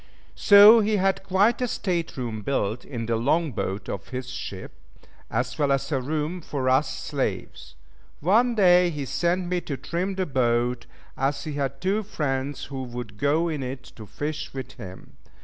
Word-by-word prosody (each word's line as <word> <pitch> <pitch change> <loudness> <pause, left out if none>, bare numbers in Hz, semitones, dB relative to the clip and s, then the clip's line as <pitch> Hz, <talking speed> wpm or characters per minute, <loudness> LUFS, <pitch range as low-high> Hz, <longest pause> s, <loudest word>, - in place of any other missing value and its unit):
So 205 +3 +8
he 215 0 +1
had 195 -1 +1
quite 195 +5 +2
a 250 - +1
state 175 -9 -2
room 115 -4 -4
built 110 -2 -1
in 115 -4 -5
the 115 0 0
long 150 +6 +1
boat 100 -2 -4
of 95 - -5
his 130 0 -6
ship, 95 -6 -7 0.6
as - - -2
well 145 -2 +2
as 135 +3 0
a 135 -3 +1
room 155 +6 -2
for 135 -4 -2
us 130 +3 +3
slaves. 105 - -4 0.4
One 230 +9 +3
day 180 -3 +5
he 150 -4 -4
sent 175 +6 0
me 180 0 -1
to 140 -5 -5
trim 185 +6 -3
the 190 -1 -1
boat, 120 -3 0 0.3
as 135 +2 -1
he 155 - -5
had 135 -2 -3
two 195 +4 +1
friends 140 -8 -3
who 135 -1 -6
would 120 -4 -7
go 155 +6 +2
in 155 -4 -3
it 130 0 -5
to 110 -2 -10
fish 150 +5 -5
with 130 -1 -6
him. 95 -7 -11
145 Hz, 180 wpm, -25 LUFS, 125-180 Hz, 0.6 s, So